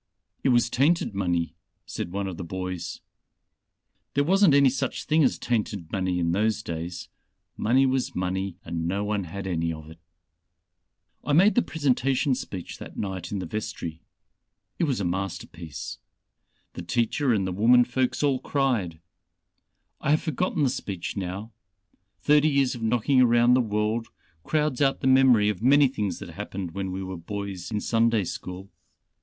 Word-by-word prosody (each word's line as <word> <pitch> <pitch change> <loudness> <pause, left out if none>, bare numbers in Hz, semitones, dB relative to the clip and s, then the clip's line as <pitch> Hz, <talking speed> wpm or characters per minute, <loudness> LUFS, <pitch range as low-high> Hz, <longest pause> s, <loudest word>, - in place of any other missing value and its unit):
"It - - +3
was 120 -1 +4
tainted 140 0 +2
money," 85 -5 -1 0.3
said 85 - -5
one 100 +1 -2
of 95 -3 -5
the - - -5
boys. 90 0 -5 1.1
"There 140 - +3
wasn't 190 -1 +5
any 140 -2 +6
such 135 -1 -2
thing 155 0 +3
as 130 - +2
tainted 105 -7 -2
money 95 -2 0
in 85 -1 +1
those 110 +4 +1
days. 85 +2 -5 0.5
Money 130 +5 +3
was 130 -1 0
money 95 0 -2
and 85 0 -3
no 100 +3 -1
one 105 -2 -1
had 95 +4 -6
any 85 -3 -1
of 80 0 -8
it. 80 - -14 1.2
"I 145 - -1
made 190 +8 +6
the 245 - +4
presentation 135 - +1
speech 95 -7 -6
that - - -10
night 95 -4 -4
in 100 - -2
the 95 - -4
vestry. 105 -7 -5 0.8
It - - +3
was 135 -7 0
a 100 - -1
masterpiece. 90 -3 -5 0.7
The - - -6
teacher 120 - 0
and 100 -4 +1
the 95 - -2
women 115 +6 +5
folks 125 +3 -1
all 140 -3 +2
cried. 120 - -1 1.0
I - - -2
have 155 +1 +4
forgotten 160 0 0
the 130 - +3
speech 100 -9 -5
now; 100 +3 -5 0.7
thirty 150 +1 +4
years 140 -3 +2
of 120 - -8
knocking 125 +4 +3
around 120 0 +5
the 130 - +5
world 110 +1 -1 0.4
crowds 150 -3 0
out 135 -1 +2
the - - -3
memory 130 -5 +5
of 105 -2 -3
many 140 +3 +6
things 105 -8 -3
that - - -8
happened 95 -3 -5
when 95 +1 -4
we 95 +1 -4
were 95 -1 -5
boys 100 0 -5
in 105 -2 -1
Sunday 115 -2 +2
school. 90 +2 -7
105 Hz, 165 wpm, -26 LUFS, 90-130 Hz, 1.2 s, any